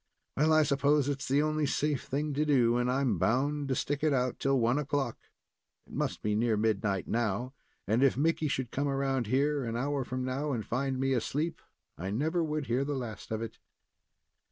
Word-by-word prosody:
Well, 155 +3 +3
I 155 0 +6
s'pose 140 0 +2
it's 140 -1 -3
the 140 +3 +3
only 155 -1 0
safe 145 -1 0
thing 145 +2 -2
to 145 +2 +1
do, 125 -6 +3
and 125 0 +1
I'm 130 -7 +1
bound 140 - +1
to 130 - 0
stick 145 +3 -2
it 155 -2 +3
out 125 -1 0
till 135 -1 +2
one 120 +4 +2
o'clock. 140 -4 -1 0.7
It - - -16
must - - -2
be 105 - +1
near 110 0 +2
midnight 105 -3 0
now, 120 +2 -1 0.3
and 110 +5 +1
if 135 -2 +4
Mickey 160 +1 +1
should 130 -4 -2
come 140 +1 -1
around 135 -3 0
here, 140 +4 +1
an 115 -1 -3
hour 140 +2 -1
from 130 +1 -3
now, 135 +3 -1
and 110 -4 -3
find 130 +2 -1
me 135 0 +1
asleep, 150 +6 -1 0.4
I 95 +3 -3
never 160 - 0
would 155 -2 -2
hear 125 +2 +1
the 145 +1 -2
last 120 -5 -6
of 110 0 -2
it." 115 - -8
135 Hz, 205 wpm, -30 LUFS, 120-145 Hz, 0.7 s, I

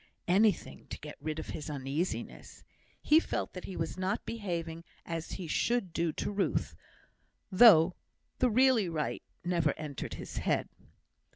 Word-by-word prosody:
Anything 200 +1 +2
to - - -6
get 150 0 -9
rid 155 +1 -3
of 160 - -6
his 150 - -6
uneasiness. 145 +5 -4 0.4
He 310 - +6
felt - - -3
that 180 - -7
he 190 - -7
was 165 +3 -3
not 190 +3 -1
behaving 170 -7 -4 0.2
as 165 -1 -4
he 185 - -5
should 195 +2 0
do, 170 -1 +1
to - - -3
Ruth, 200 -1 0 0.8
though 185 -4 +8 0.5
the 255 - +4
really 240 -4 +4
right 155 -2 -2 0.2
never 170 -4 +2
entered 150 -3 -5
his - - -8
head. - - 0
175 Hz, 150 wpm, -31 LUFS, 160-205 Hz, 0.8 s, though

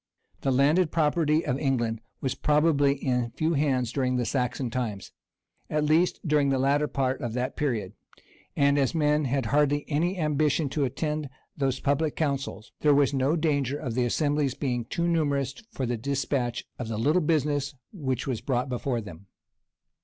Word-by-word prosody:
The - - -1
landed 150 +7 +3
property 155 0 +2
of 130 - -1
England 120 -5 0 0.2
was 130 - -1
probably 150 -2 +3
in 125 -3 -1
few 160 +1 +1
hands 135 -5 +1
during 130 -1 0
the 125 -1 0
Saxon 125 -1 -1
times, 110 -6 -3 0.6
at 150 0 0
least, 160 +4 +2
during 150 -2 +3
the 135 - +2
latter 140 +3 +2
part 135 -2 -1
of 120 -2 -3
that 125 +1 -2
period; 110 -10 -2 0.6
and, 140 0 +3
as 140 +4 +1
men 150 -1 +2
had 135 +1 0
hardly 145 0 +2
any 170 +5 0
ambition 150 -2 +1
to 140 +1 0
attend 150 +2 -2 0.3
those 135 -2 0
public 145 +2 0
councils, 140 -7 -2
there 150 -2 +4
was 140 -1 +3
no 135 +3 +2
danger 145 -4 0
of 130 -6 -4
the 125 +1 +1
assembly's 145 +1 0
becoming 125 -4 -2
too 170 +8 -1
numerous 145 -5 +1 0.2
for 130 - -3
the 120 0 -1
despatch 130 -1 -2
of 125 - -4
the 110 -1 -3
little 150 +11 +2
business 145 -3 0 0.2
which 130 - -2
was 125 -5 -2
brought 125 +1 -1
before 125 -1 -2
them. 100 -2 -11
140 Hz, 170 wpm, -27 LUFS, 125-150 Hz, 0.6 s, there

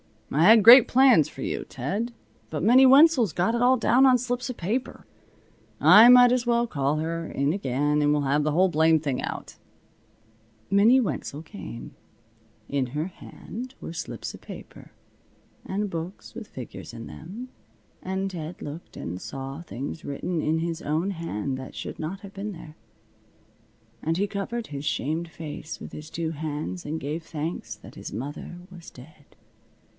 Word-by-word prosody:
"I 155 +4 +3
had 220 +1 +8
great 240 +3 +10
plans 250 - +5
for - - -11
you, - - -3
Ted. 200 - -3 0.4
But 155 0 -4
Minnie 250 +6 +7
Wenzel's 265 - +6
got 180 +8 +1
it 235 - 0
all 250 +1 +5
down 255 +2 +4
on 255 -1 +6
slips 245 +1 -3
of 255 - -4
paper. 225 +9 -3 0.7
I 220 +3 +8
might 245 0 +8
as 250 -1 0
well 235 0 +3
call 140 -8 -1
her, 165 +1 -3
in 140 +1 0
again, 145 -3 0
and 145 0 +3
we'll 150 0 +2
have 145 +2 +1
the 150 0 0
whole 185 +4 +4
blamed 160 -1 +3
thing 140 -4 -1
out." - - -6 1.1
Minnie 220 +7 +5
Wenzel 160 - -4
came. 155 - -9 0.7
In 140 -2 0
her 150 +6 -3
hand 245 +6 -9
were - - -6
slips 165 - -6
of - - -11
paper, - - -12 0.7
and 205 +2 -2
books 170 +2 -7
with 220 -2 -8
figures 125 -2 -9
in 115 -1 -8
them, 215 +11 -9 0.5
and 190 +1 -3
Ted 165 -1 -7
looked 150 +4 -8
and 90 +2 -6
saw 135 +3 -6
things 150 0 -7
written 160 +4 -3
in 160 +2 0
his 165 +1 -3
own 160 +7 -1
hand 140 - -4
that 130 0 -9
should - - -7
not 175 +5 -5
have 200 -1 -11
been 205 +1 -5
there. 155 -3 -11 1.3
And 165 +1 -1
he 200 +2 +1
covered 225 +4 -4
his 140 0 -6
shamed 155 +4 -1
face 160 -1 -8
with - - -8
his 155 +1 -9
two 165 0 -3
hands 155 +3 -5
and 155 +2 -3
gave 150 +4 -3
thanks 160 +1 -5
that - - -14
his - - -8
mother 145 +6 -6
was 175 -2 -11
dead. 145 +3 -17
165 Hz, 170 wpm, -26 LUFS, 150-215 Hz, 1.3 s, great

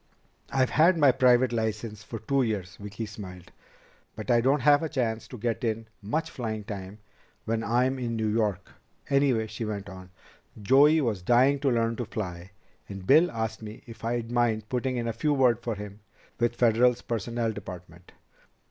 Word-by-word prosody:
"I've 130 -2 +1
had 165 +4 +4
my 145 -4 +6
private 125 -1 +3
license 110 -1 -3
for 115 - -7
two 135 +6 0
years." 105 -7 -2
Vicki 105 +2 -6
smiled. 95 -4 -10 0.6
"But 110 +3 -3
I 120 -1 +4
don't 135 +3 +2
have 145 +2 +5
a 160 - -2
chance 115 -6 -2
to 125 - -9
get 115 +3 -2
in 115 -1 -1 0.2
much 155 +11 -2
flying 110 -4 -4
time 100 -2 -7 0.5
when 115 0 -1
I'm 125 +3 +1
in 120 -2 -2
New 110 -1 -1
York. 105 -4 -1 0.4
Anyway," 135 -5 +3
she 110 +1 -6
went 100 -2 -4
on, 95 -1 -11 0.5
"Joey 140 +9 +5
was 110 -8 -1
dying 125 +8 +4
to 140 0 +1
learn 115 -2 0
to 120 - -3
fly, 90 -6 -6 0.4
and 95 -2 -8
Bill 155 - +5
asked 110 -1 -4
me 110 0 -9
if 115 -3 -12
I'd 115 0 -2
mind 115 -3 0
putting 130 0 -1
in 120 -1 -2
a 115 - -1
good 145 +6 0
word 125 -4 +3
for 115 -2 -3
him 105 0 -9 0.4
with 120 0 +1
Federal's 120 +1 +3
personnel 115 0 -2
department. 90 -4 -10
115 Hz, 180 wpm, -27 LUFS, 105-125 Hz, 0.6 s, my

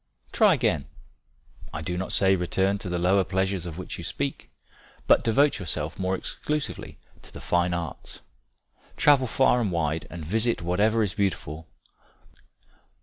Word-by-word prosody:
"Try - - +5
again 70 -1 0 0.8
I 75 - -5
do 90 +3 -3
not 95 +1 -3
say 95 0 +4
return 95 +2 0
to 95 - -6
the 90 - -1
lower 95 +3 +3
pleasures 95 -1 -1
of 80 -1 -7
which 95 - -6
you - - -6
speak, 70 - -4 0.6
but - - +5
devote 130 +4 +3
yourself 80 -2 -3
more 95 0 0
exclusively 150 +9 -4 0.2
to - - -13
the - - -9
fine 90 0 +1
arts. 85 -2 -6 0.8
Travel 140 -3 +5
far 125 0 +3
and 105 -5 0
wide 80 -2 -1
and 85 -3 -7
visit 110 +2 0
whatever 105 +6 +2
is 100 -4 -2
beautiful. 80 -5 -2
95 Hz, 150 wpm, -26 LUFS, 85-105 Hz, 0.8 s, Try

